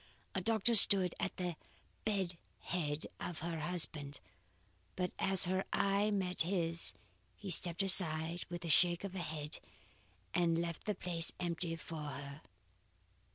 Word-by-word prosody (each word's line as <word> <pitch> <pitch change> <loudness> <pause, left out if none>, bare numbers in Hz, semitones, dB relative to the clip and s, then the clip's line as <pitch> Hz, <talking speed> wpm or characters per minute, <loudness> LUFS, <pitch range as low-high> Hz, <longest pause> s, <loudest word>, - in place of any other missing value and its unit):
A - - -2
doctor 225 +1 +2
stood 195 -4 +9
at 195 - -3
the 180 -2 -3 0.5
bed 195 -5 -1 0.3
head 155 -4 -3
of 170 -3 -6
her 165 0 -4
husband, 150 -4 -3 0.8
but 180 -1 -2
as 195 -1 +3
her 185 +2 -1
eye 200 +1 +1
met 190 -3 -1
his 170 -1 0 0.4
he 200 -3 -6
stepped 175 +2 +1
aside 170 -3 +3
with 175 0 -7
a - - -4
shake 175 +3 +3
of 200 - -5
the 190 - -6
head 155 -3 -4 0.7
and 170 -2 +1
left 170 -1 -4
the 210 - -2
place 170 -2 -2
empty 170 -1 -3
for 165 -1 -8
her. 140 0 -8
175 Hz, 145 wpm, -34 LUFS, 165-190 Hz, 0.8 s, stood